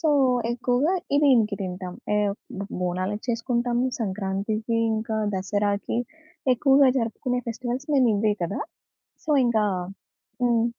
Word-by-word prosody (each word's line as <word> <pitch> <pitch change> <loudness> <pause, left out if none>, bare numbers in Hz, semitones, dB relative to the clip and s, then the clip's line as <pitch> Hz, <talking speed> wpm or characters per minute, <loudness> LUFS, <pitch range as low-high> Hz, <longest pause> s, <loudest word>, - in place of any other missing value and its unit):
So, 320 - +1 0.4
ఎక్కువగా 250 +7 +1 0.2
ఇది 285 - +4
దీనికి 225 -6 +4
తింటాం. 180 -1 -5 0.2
ఏవ్ 205 -1 +1 0.3
బొ 200 - -4 0.2
బోనాలకి 185 +4 -2
చేసుకుంటాం, 240 +1 0 0.2
సంక్రాంతికి, 210 +2 -2 0.2
ఇంకా 220 0 -2 0.2
దసరాకి 205 +3 -1 0.6
ఎక్కువగా 270 +2 +5
జరుపుకునే 245 +2 -1
ఫెస్టివల్స్ 245 +4 -4
మేమివే 220 -5 +3
కదా! 185 +4 -3 0.6
సో, 315 - -3 0.2
ఇంకా 220 -3 +2 0.8
హ్మ్. 235 -2 +3
225 Hz, 110 wpm, -25 LUFS, 200-245 Hz, 0.8 s, ఎక్కువగా